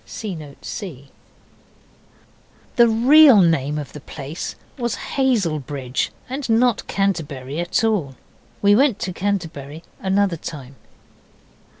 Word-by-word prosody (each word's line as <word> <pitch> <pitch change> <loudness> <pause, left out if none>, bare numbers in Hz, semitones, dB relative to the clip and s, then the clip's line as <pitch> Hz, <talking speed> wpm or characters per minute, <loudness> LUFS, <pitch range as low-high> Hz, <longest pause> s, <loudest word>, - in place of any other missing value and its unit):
(See 215 -4 -6
Note 150 -4 -11
C.) 140 - -7 1.6
The 235 -1 +6
real 255 +2 +7
name 150 -5 +2
of 145 -3 -6
the 150 - -8
place 145 +2 -7 0.2
was 240 -3 -2 0.2
Hazelbridge, 155 - 0 0.2
and 265 0 -5
not 230 0 +2
Canterbury 155 -8 -2
at 175 +5 0
all. 190 -12 0 0.5
We 205 0 +6
went 265 -2 +3
to 185 - -4
Canterbury 165 -6 -3 0.2
another 190 -2 +1
time. 140 -4 -8
175 Hz, 110 wpm, -21 LUFS, 145-225 Hz, 1.6 s, real